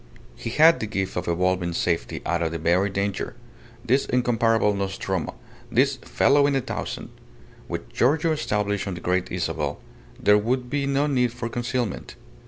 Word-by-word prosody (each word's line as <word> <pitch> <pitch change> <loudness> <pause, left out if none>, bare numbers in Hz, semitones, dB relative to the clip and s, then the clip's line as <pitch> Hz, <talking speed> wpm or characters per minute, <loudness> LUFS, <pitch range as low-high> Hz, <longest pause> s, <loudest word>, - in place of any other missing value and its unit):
He 115 - -5
had 160 +7 +6
the 110 - -3
gift 95 -2 -2
of 90 - -3
evolving 90 0 +1
safety 85 0 -1
out 85 0 0
of 80 -1 0
the 85 - -3
very 85 +5 +2
danger, 100 0 -2 0.5
this 130 +3 +2
incomparable 115 -3 +2
Nostromo, 95 -2 -3 0.4
this - - +3
"fellow 140 +1 +3
in 140 - +1
a 135 - +2
thousand." - - -5 0.6
With - - -5
Giorgio 155 - +2
established 105 -9 -1
on 95 - -3
the - - -7
Great 90 +1 -1
Isabel, - - -2 0.4
there 105 0 +5
would 125 +3 -1
be 140 -1 0
no 140 +1 +2
need 125 -5 +1
for 120 0 -5
concealment. 120 -2 -3
105 Hz, 165 wpm, -24 LUFS, 95-125 Hz, 0.6 s, had